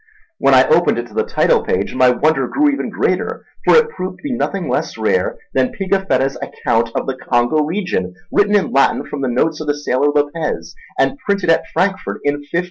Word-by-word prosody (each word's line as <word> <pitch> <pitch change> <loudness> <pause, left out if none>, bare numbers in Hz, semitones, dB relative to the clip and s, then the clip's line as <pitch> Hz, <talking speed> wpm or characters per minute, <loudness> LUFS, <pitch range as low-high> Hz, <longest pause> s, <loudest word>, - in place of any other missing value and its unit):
When - - +4
I - - +5
opened 470 - +3
it - - -3
to - - -17
the 450 - +1
title 465 +1 +2
page 465 -1 -1
my 130 -1 +4
wonder 135 +1 +1
grew 290 +1 +2
even 280 - -3
greater, - - -2 0.2
for - - +5
it 465 -1 +4
proved 185 - -5
to - - -23
be 290 - -3
nothing 200 -6 -2
less - - -2
rare - - 0 0.2
than 250 - +1
Pigafetta's 190 -9 0
account 115 0 -1
of - - -1
the 135 - -3
Congo 120 +3 +1
region, 150 - -2 0.2
written 205 0 +3
in 200 - +1
Latin 135 - +2
from 145 - -6
the 135 - 0
notes 155 +6 0
of 155 - -6
the 145 0 0
sailor 145 -1 0
Lopez 145 +2 -2 0.2
and 280 - +1
printed 200 -8 0
at 165 - +1
Frankfort 190 +1 -1
in 145 - +2
1598. 145 +3 -3
165 Hz, 210 wpm, -17 LUFS, 140-210 Hz, 0.2 s, I